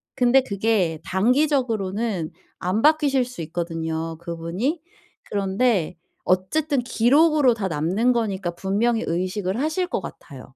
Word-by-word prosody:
근데 250 +1 +4
그게 200 -8 0
단기적으로는 225 - 0 0.3
안 185 +4 -1
바뀌실 290 -4 +3
수 245 -7 -8
있거든요 165 -1 -4
그분이. 170 - -3 0.4
그런데 195 -2 0 0.3
어쨌든 275 - +1
기록으로 270 +3 +3
다 205 -4 -3
남는 185 +10 +1
거니까 195 -6 -1
분명히 220 +6 0
의식을 185 +4 -2
하실 315 +5 0
것 210 - -2
같아요. 135 -6 -11
205 Hz, 285 characters per minute, -23 LUFS, 175-250 Hz, 0.4 s, 근데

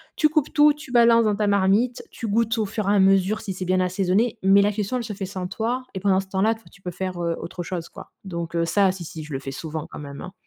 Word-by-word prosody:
Tu 305 - +4
coupes 305 -2 0
tout, 295 0 +6
tu 295 -3 -12
balances 235 -1 +5
dans 210 -1 +2
ta 210 0 0
marmite, 205 +5 +2
tu 230 - -6
goûtes 225 +2 +1
au 215 - +1
fur 200 0 -3
et - - +4
à - - +4
mesure 195 +2 +3
si 195 - -4
c'est 185 0 -5
bien 185 +1 +2
assaisonné 195 +5 +1
mais 195 +1 +6
la 205 - +2
cuisson 210 +3 -3
elle 245 - -3
se 210 - -5
fait 195 0 -5
sans 185 -1 -5
toi 240 +6 -2
et 190 - -4
pendant 190 -1 +2
ce 190 - -13
temps-là 195 +4 +1
toi 225 - -19
tu 195 - -20
peux 180 - -5
faire, 180 0 -4
heu, 170 -1 -1
autre 175 +1 -6
chose, 170 -2 -5
quoi, - - -12
donc 170 -3 -5
heu, 170 - +2
ça, 195 +1 +3
si 180 -2 -8
si 155 0 -8
je 150 - -8
le 135 - -2
fais 135 0 -6
souvent 155 +2 -6
quand - - -8
même, 140 -1 -8
hein. 185 - -8
195 Hz, 295 wpm, -23 LUFS, 180-220 Hz, -, tout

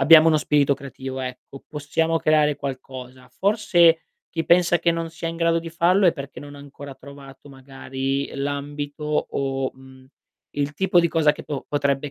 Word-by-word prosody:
abbiamo 160 +3 +8
uno 155 - +4
spirito 145 -2 +2
creativo 135 -1 -7
ecco, 130 +1 -8
possiamo 160 +2 -1
creare 150 -2 +3
qualcosa. 130 -2 -8
Forse 175 - +3 0.3
chi 165 -1 -2
pensa 175 0 +4
che 170 +1 +2
non 165 0 -3
sia 165 0 -5
in 165 - -5
grado 165 0 +2
di 165 0 -7
farlo 180 +3 +3
è 170 - +5
perché 140 -2 -8
non 145 0 -10
ha - - -11
ancora 140 0 -10
trovato 140 0 -13
magari 135 0 -4
l'ambito, 145 +1 -4 0.3
o 135 -1 -2
mhmm, 130 0 -17 0.5
il 145 0 -2
tipo 190 -1 +3
di 170 - +2
cosa 155 -2 +3
che - - -10
do 145 -3 -4
potrebbe 140 0 0
145 Hz, 175 wpm, -23 LUFS, 135-165 Hz, 0.5 s, abbiamo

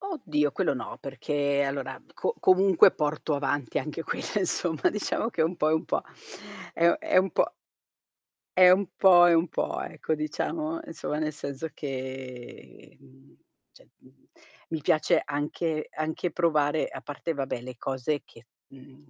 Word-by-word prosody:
Oddio, 155 - -1
quello - - 0
no, - - -6
perché 140 -1 -1
allora, 135 -1 -3
co 470 - -2
comunque 185 -1 +6
porto 150 +1 -1
avanti 140 -2 -1
anche 155 +2 -5
quella, - - -4
insomma, 175 -5 +1
diciamo 210 +2 -1
che 170 - -2
è - - +5
un 170 +3 -1
po' 155 - +1
e - - +3
un 160 - 0
po'. - - -1 0.7
È 170 - +3
u - - +6
è - - +1
un 185 0 +3
po' - - +2 1.1
è 185 -1 +9
un 190 +1 +3
po' 180 -3 +7
e 175 - +5
un 165 +1 +2
po', - - -2
ecco, 160 - -3
diciamo, 310 - -3
insomma, 150 - -4
nel 155 0 -1
senso 140 +1 -5
che, 130 -2 -8
mhmm 135 0 -21 0.4
cioè, - - -21
mhmm, - - -24 0.5
mi 160 - -2
piace 155 +2 +3
anche 155 +2 -2
anche 160 +2 -3
provare, 155 -3 +1
a - - -8
parte 150 +3 -4
vabbè 135 -4 -3
le 125 0 -8
cose 135 +4 -2
che 115 +1 -19 0.2
mhmm, 135 +2 -17
155 Hz, 165 wpm, -27 LUFS, 140-170 Hz, 1.1 s, è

